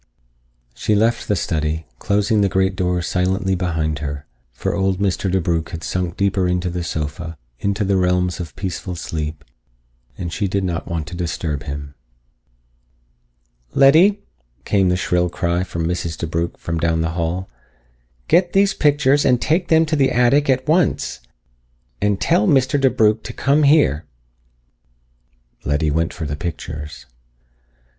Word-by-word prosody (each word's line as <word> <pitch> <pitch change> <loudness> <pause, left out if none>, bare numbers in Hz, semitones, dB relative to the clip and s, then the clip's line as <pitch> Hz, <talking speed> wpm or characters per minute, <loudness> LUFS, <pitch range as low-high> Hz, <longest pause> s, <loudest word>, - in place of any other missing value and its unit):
She 105 - 0
left 115 +3 +1
the 105 - +2
study, 80 -3 -2
closing 105 +1 +1
the 100 - +2
great 95 0 +1
door 90 -2 0
silently 95 +2 0
behind 80 -4 -1
her, 70 0 -5 0.3
for - - -3
old 95 -1 +1
Mr. 95 -1 0
DeBrugh 85 -3 0
had 80 -1 -7
sunk 90 +1 -2
deeper 100 -2 +1
into 90 0 -1
the 90 0 -3
sofa, 80 +1 -4 0.2
into 100 +1 -1
the 95 0 +2
realms 90 0 +1
of 85 -3 -7
peaceful 90 -1 -4
sleep, 75 -2 -5 0.7
and 85 -1 -5
she 105 - -1
did 100 +1 -1
not 85 -3 -3
wish 85 -3 -2
to 85 +3 -8
disturb 80 -3 -3
him. 70 -1 -6 1.8
"Letty!" 175 +9 +5 0.4
came 95 -3 +2
the 90 - +1
shrill 90 -1 +1
cry 85 0 -1
of 95 - -6
Mrs. 85 -1 -2
DeBrugh 85 +1 -3
from 85 -1 -3
down 80 0 +1
the 80 - 0
hall. 85 +2 -2 0.8
"Get 175 -1 +3
these 195 0 +4
pictures 145 -1 +3
and 125 -2 +3
take 170 +7 +1
them 160 0 +4
to 155 0 -1
the 135 -3 +3
attic 130 +4 +3
at 130 +1 +1
once. 160 +1 +1 0.8
And 105 -1 +1
tell 105 - +2
Mr. 135 0 +3
DeBrugh 110 -4 +3
to - - -8
come 140 +2 +2
here." 140 - +4 1.6
Letty 75 +1 0
went 80 +2 0
for 85 - -6
the 75 0 -3
pictures. 75 -4 -6
90 Hz, 150 wpm, -20 LUFS, 80-105 Hz, 1.8 s, Letty